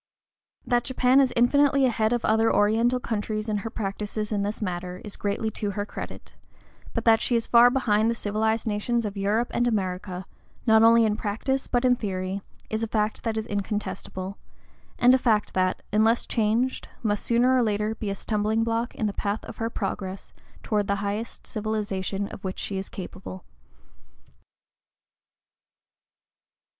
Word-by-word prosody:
That 240 -1 +2
Japan 260 +1 +4
is 260 -2 +2
infinitely 275 +3 +4
ahead 220 -3 +1
of 240 -1 0
other 225 +1 +3
Oriental 230 +4 +3
countries 215 -2 -3
in 215 -1 0
her 215 +2 -4
practices 210 0 -4
in 205 -1 0
this 205 +1 -2
matter 180 -2 -4
is 205 - -7
greatly 210 +2 -2
to 210 -1 -3
her 205 - -1
credit; - - -8 0.6
but - - -2
that 225 -1 +5
she 245 - +1
is 230 - +1
far 240 +1 +7
behind 225 -4 +2
the 235 - 0
civilized 220 +1 0
nations 225 +2 0
of 205 -1 -4
Europe 210 +4 0
and 240 - +2
America, 185 -3 -2 0.4
not 220 -2 +6
only 230 0 +6
in 210 -1 +1
practice 230 +6 -2
but 245 0 +1
in 250 -1 +5
theory, 190 -3 -3 0.3
is 220 0 -2
a 225 - -1
fact 215 0 -1
that 225 -1 -2
is 220 - -2
incontestable, 200 -2 -4 0.6
and 245 +1 +6
a 260 - +4
fact 220 -4 +1
that, 185 0 0
unless 220 +2 +3
changed, 230 +3 0 0.2
must 205 -2 0
sooner 245 +2 +3
or 255 - +4
later 210 -1 0
be 220 -2 -4
a 200 - -2
stumbling 215 +2 0
block 230 +1 -1
in 220 - -2
the 205 - -1
path 205 +2 -2
of - - -9
her 225 0 -1
progress 195 -3 -5 0.3
toward 210 -2 0
the 200 - +1
highest 210 +3 -4
civilization 205 -2 -2
of - - -10
which 185 -1 -4
she 195 -1 -3
is 195 - -7
capable. 180 - -8
215 Hz, 170 wpm, -26 LUFS, 205-230 Hz, 0.6 s, far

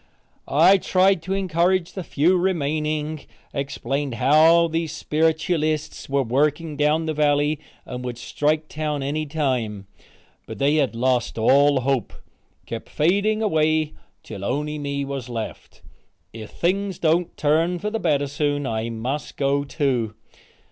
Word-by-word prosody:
I 170 +8 +5
tried 190 -1 +3
to 190 +4 -2
encourage 180 -1 +1
the 190 - -5
few 165 +4 +2
remaining, 155 -3 -1 0.3
explained 140 -1 -3
how 160 +6 +5
the 165 0 -1
sperritualists 155 0 -1
were 140 0 +2
working 150 +5 0
down 150 +2 +1
the 160 - -1
valley 145 0 +2 0.3
and 125 0 -6
would 125 -2 -5
strike 150 +5 -1
town 150 -2 -3
any 150 +3 -2
time, 125 -9 -2 0.6
but - - -7
they 145 +3 +2
had 135 -6 +1
lost 125 0 0
all 140 +4 +4
hope 135 -1 -1 0.5
kept 115 -1 -7
fading 200 +7 +1
away 155 -4 +1 0.3
till 100 -3 -8
only 150 +7 -2
me 140 -1 -3
was 135 -3 -5
left. 115 -2 -7 0.5
If 110 -2 -8
things 190 +1 -1
don't 165 +1 +1
turn 165 +4 +2
for 210 +4 -3
the 225 - -2
better 145 -6 +1
soon 145 0 -1
I 110 -1 -2
must 125 +6 -4
go, 140 0 +1
too. 130 -7 -1
150 Hz, 140 wpm, -23 LUFS, 135-160 Hz, 0.6 s, I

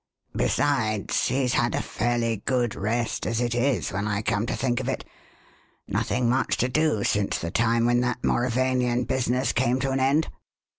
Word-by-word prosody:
Besides, 110 -8 +1
he's 130 -1 0
had - - +1
a - - 0
fairly 115 0 -1
good 125 -3 +1
rest 115 +4 -2
as 115 +1 -1
it 120 -1 0
is, 120 - 0
when 100 +2 -2
I 105 0 -1
come 105 +1 0
to - - -1
think 120 -2 0
of 130 0 -3
it. - - -3 0.8
Nothing 125 -1 0
much 130 +3 +1
to 125 - +1
do 150 -6 +1
since 100 -1 0
the 85 - -4
time 115 +2 +2
when 120 0 +3
that 125 0 -2
Mauravanian 125 0 +1
business 125 0 0
came 125 +1 +1
to 135 0 0
an 135 - 0
end. 140 +4 +2
120 Hz, 180 wpm, -25 LUFS, 115-130 Hz, 0.8 s, when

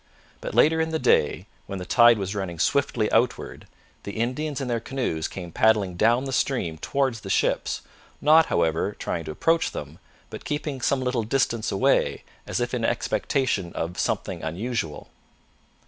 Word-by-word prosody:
But - - -5
later 160 +1 +4
in 160 - 0
the 160 - -1
day, 125 - +2 0.2
when 100 - -5
the 90 - -6
tide 120 +3 +6
was 95 -1 -3
running 95 -4 -4
swiftly 115 - +1
outward, 120 +2 0 0.3
the 100 - -7
Indians 130 +6 -2
in 135 - -3
their 120 -1 0
canoes 115 -10 -2
came 90 -3 -8
paddling 105 -2 +2
down 120 +7 +3
the 135 -1 -4
stream 90 - -1
towards 135 - -1
the 95 - -8
ships, - - 0 0.4
not, 160 +2 +5
however, 85 +4 +1
trying 85 -2 -3
to - - -5
approach 165 - +1
them, 75 +2 -7 0.3
but - - -8
keeping 145 -3 -3
some 130 +2 +1
little 125 -2 0
distance 115 -1 0
away 95 - +1 0.2
as - - -2
if - - -2
in - - -1
expectation 105 -10 0
of 85 +2 -4
something - - -2
unusual. 85 -1 -4
115 Hz, 165 wpm, -25 LUFS, 90-135 Hz, 0.4 s, tide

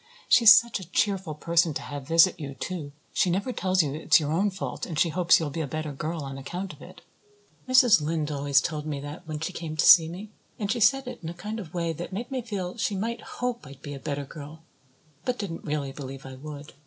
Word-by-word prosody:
She 245 -2 +5
is 210 -1 +12
such 235 -1 +2
a 180 -3 -11
cheerful 190 -5 0
person 170 0 +1
to - - -2
have 145 -2 -7
visit 165 +3 +5
you, 140 -3 -6
too. 155 0 -5 0.2
She 185 - +2
never 200 +8 -1
tells 185 -4 +2
you 140 -2 -3
it's 155 +3 +4
your 150 -1 -2
own 190 +6 +2
fault 190 -1 -5
and 160 - -5
she 170 - +3
hopes 170 +1 +4
you'll 155 -3 -3
be 160 - -3
a 150 - -2
better 155 +2 -4
girl 155 +3 -4
on 135 0 -6
account 180 +7 -5
of - - -17
it. - - -13 0.7
Mrs. 250 - +6
Lynde 155 0 -1
always 140 -1 +2
told 155 -2 -4
me 145 -2 -3
that 150 +4 -9
when 155 -1 -4
she 160 +4 -4
came 160 -3 -6
to - - +3
see 165 -2 +8
me; 195 +5 -8 0.3
and 205 -2 -2
she 245 - 0
said 265 +6 +4
it 250 - -6
in 165 - -5
a 170 - -7
kind 215 +5 -5
of 180 -4 -9
way 170 -1 -1
that 175 +4 -7
made 235 +7 -5
me 260 -1 -2
feel 200 -5 -5
she 210 - 0
might 230 +4 -3
hope 245 -9 -4
I'd 135 0 -13
be 145 - -6
a 140 - -7
better 140 0 -4
girl 155 +3 -10 0.6
but 250 0 -1
didn't 180 -5 -5
really 145 -2 -2
believe 135 -1 -8
I 135 - -8
would. 145 +2 -9
165 Hz, 250 wpm, -26 LUFS, 150-195 Hz, 0.7 s, is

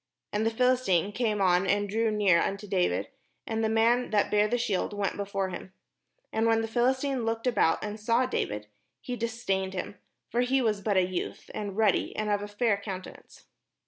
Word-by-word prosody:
And 215 +2 +1
the - - +4
Philistine 225 -6 +2
came 215 -2 0
on 185 0 +3
and 205 +1 +2
drew 225 +3 +1
near 205 -5 +3
unto 200 +2 -2
David; 190 -3 0 0.4
and 225 0 -2
the 220 - +2
man 230 +3 +3
that 205 -1 +1
bare 210 0 +4
the 245 - 0
shield 210 -4 -1
went 200 -2 -1
before 200 -1 -2
him. 185 +1 -8 0.6
And 220 +1 +2
when 225 0 +3
the 225 - -2
Phih'stine 260 +2 +1
looked 225 +1 -2
about, 235 -10 +2
and 210 +1 -5
saw 230 +4 +2
David, 105 - -2 0.4
he 250 - -4
dis 230 0 -5
dained 190 -1 0
him: 190 +2 -5 0.3
for 240 - +2
he 260 +2 +2
was 215 -5 0
but 200 -1 +1
a 185 - +4
youth, 185 -1 -5
and 205 -2 -5
ruddy, 215 -4 +2
and 215 -1 -1
of 205 0 +1
a 205 - -5
fair 205 0 +1
countenance. 195 -2 -9
210 Hz, 200 wpm, -28 LUFS, 195-230 Hz, 0.6 s, the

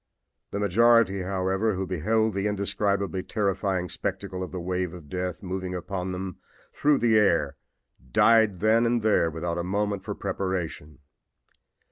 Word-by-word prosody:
The - - -4
majority, 105 0 +4
however, 95 +3 0
who 95 +1 -2
beheld 110 +5 0
the 100 +2 -1
indescribably 100 -1 -1
terrifying 95 -3 -1
spectacle 95 0 -4
of 90 - -5
the 95 - -4
wave 90 0 -2
of 80 -5 -12
death 90 +1 -4
moving 95 0 -4
upon 95 0 -4
them 90 -1 -5 0.4
through 145 -1 +3
the 115 -3 +4
air 85 -9 +2 0.6
died 110 - +4
then 115 +2 +4
and 120 -1 +1
there 105 -6 +3
without 85 +2 -3
a - - -2
moment 100 +2 -1
for 105 0 -4
preparation. 95 -6 -4
95 Hz, 145 wpm, -26 LUFS, 90-105 Hz, 0.6 s, majority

